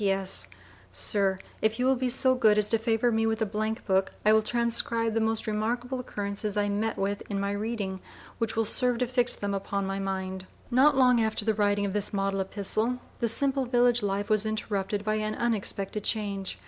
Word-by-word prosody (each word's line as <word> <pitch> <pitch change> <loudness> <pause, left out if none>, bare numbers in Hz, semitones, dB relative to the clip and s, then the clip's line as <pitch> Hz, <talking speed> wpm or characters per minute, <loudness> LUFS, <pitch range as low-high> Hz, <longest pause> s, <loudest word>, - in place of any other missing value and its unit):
P.S. 195 -1 +2 0.4
Sir, 195 -2 +1 0.2
if 220 +1 +1
you 250 - 0
will 265 +1 +4
be 255 0 -1
so 260 +1 +5
good 220 -4 +4
as 210 -1 +4
to 225 - +3
favor 225 +1 +1
me 225 0 +1
with 220 0 0
a 220 - +1
Blank 215 +1 -3
book, 190 -1 +1
I 215 - +6
will 220 - +5
transcribe 230 0 0
the 225 - +1
most 220 0 0
remarkable 240 +4 -2
occurrences 205 -3 -3
I 205 0 +1
met 215 +2 -1
with 200 +1 -1
in 200 -1 -2
my 200 0 -1
reading, 205 -2 -3 0.4
which 230 -1 -1
will 225 0 +1
serve 250 +2 0
to 250 - +1
fix 245 0 +2
them 200 0 -3
upon 200 0 -2
my 195 0 -3
mind. 190 -1 -4 0.2
Not 270 +3 +5
long 250 -3 +5
after 220 -1 -1
the 220 - +2
writing 205 -1 +1
of 195 - -3
this 210 0 -2
model 195 0 0
epistle, 215 +5 0 0.2
the 235 - +1
simple 270 +2 0
village 245 -1 +3
life 200 0 -1
was 215 -1 +2
interrupted 210 -2 -2
by 215 0 +1
an 215 0 -2
unexpected 210 -3 -2
change. 200 -3 -2
215 Hz, 205 wpm, -27 LUFS, 200-235 Hz, 0.4 s, I